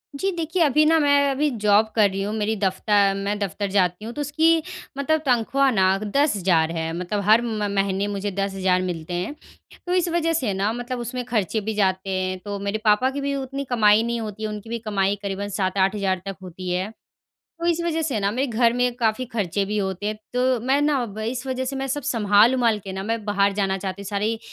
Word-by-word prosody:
जी, 385 +7 -1
देखिए 340 +1 -2
अभी 300 0 +4
ना 325 +1 +5
मैं 285 -1 +4
अभी 290 +2 +1
जॉब 210 +1 +5
कर 210 -3 +5
रही 195 +1 -4
हूँ 210 - -3
मेरी 220 +1 0
दफ्तर 200 +1 +2
मैं 200 +1 -2
दफ्तर 200 +1 -2
जाती 185 0 +1
हूँ 230 - -6
तो 295 - -4
उसकी 320 +3 +3 0.4
मतलब 310 +2 +1
तनख़्वाह 265 +2 +2
ना 190 -2 +3
10,000 195 - +2
है 160 0 -2
मतलब 180 +3 -2
हर 220 +3 +5
म 215 -3 -2
महीने 195 0 0
मुझे 200 0 -3
10,000 190 -1 0
मिलते 175 -2 -4
हैं। 180 +12 -3 0.5
तो 355 - -1
इस 360 -1 +2
वजह 330 -1 +1
से 250 -11 0
ना 200 +3 0
मतलब 245 +1 -4
उसमें 245 +1 -4
खर्चे 220 -3 -1
भी 220 +2 -3
जाते 190 -1 0
हैं 185 0 -1
तो 205 0 -4
मेरे 200 +2 -2
पापा 215 +5 +4
की 280 +1 -4
भी 280 0 -1
उतनी 275 +1 -4
कमाई 215 -3 +4
नहीं 235 0 -2
होती 215 0 -6
है, 215 - -1
उनकी 210 +1 -7
भी 235 0 -3
कमाई 205 -2 0
करीबन 200 +1 -3
7-8000 190 -1 0
तक 195 -1 -4
होती 185 +1 -7
है, 185 +3 -1 0.7
तो 335 - -3
इस 340 -1 +2
वजह 325 -1 0
से 275 -8 -1
ना 200 - +1
मेरे 255 +6 -1
घर 235 0 +2
में 245 0 +1
काफ़ी 230 +1 0
खर्चे 200 -2 -1
भी 210 +2 -2
होते 190 0 -2
हैं। 215 - -2 0.2
तो 255 0 +2
मैं 270 +2 +3
ना 290 -3 +2
व 215 -1 -8
इस 245 +4 -3
वजह 260 0 -2
से 270 +1 -4
मैं 270 - -2
सब 285 +2 -2
सँभाल-वँभाल 230 -1 +3
के 195 - -6
ना 190 0 -4
मैं 225 +1 -2
बाहर 200 -1 +2
जाना 195 -1 0
चाहती 190 +1 -5
हूँ, - - -9
सारी 210 +2 -1
215 Hz, 225 wpm, -23 LUFS, 195-260 Hz, 0.7 s, ना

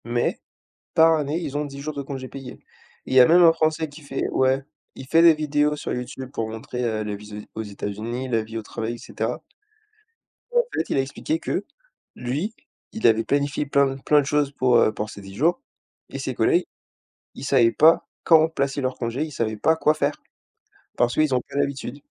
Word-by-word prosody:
Mais, 120 0 -1 0.5
par 160 0 +6
année, 150 +1 -1
ils 145 -4 -4
ont 150 - -1
10 140 -1 -8
jours 155 +1 -5
de 140 - -4
congés 135 -1 -6
payés. 135 -1 -9 0.5
Il - - -5
y - - +9
a 125 - +9
même 175 +2 +6
un 170 -1 +8
Français 160 -1 0
qui 145 +2 -13
fait 140 -2 -3
ouais. 130 +1 +2 0.3
Il 135 - -10
fait 165 +4 +5
des 170 -1 +8
vidéos 150 -1 +1
sur - - -5
YouTube 125 +1 -5
pour 115 -5 -3
montrer, 110 +3 -5
heu, 110 -2 -1
la 105 -1 -4
vie 105 0 -10
aux 110 - -3
aux - - -4
États-Unis, 110 +5 -5
la 115 -3 0
vie 110 +1 -7
au - - -5
travail 110 +2 -5
et - - -7
cetera. 120 +7 -4 1.1
Et - - +1
en 480 - +5
fait - - -2
il - - 0
a - - +4
expliqué 295 - -3
que, - - -2 0.5
lui, 145 - -3 0.4
il 220 - +2
avait 115 0 +4
planifié 145 +2 0
plein 140 -1 +2
plein 150 +2 +4
de - - -5
choses 145 -1 +1
pour, 130 -3 +3
heu, 110 - +4
pour 105 - -4
ces 100 - -10
10 95 0 -11
jours 170 - +1 0.5
et - - -6
ses - - -3
collègues, 365 -1 +2 0.7
ils - - -9
savaient 125 -5 +4
pas 160 +6 +4 0.2
quand 160 -1 +6
placer 140 -3 -2
leurs 130 -1 -1
congés. 120 +4 -2
Ils 155 - -9
savaient 110 -5 -2
pas 160 +10 +3
quoi 155 -1 +3
faire 145 -1 -2 0.8
parce 120 -1 +2
qu'ils 155 -3 +2
ont 125 - +1
pas - - -6
l'habitude. 140 -1 -2
135 Hz, 215 wpm, -23 LUFS, 120-150 Hz, 1.1 s, y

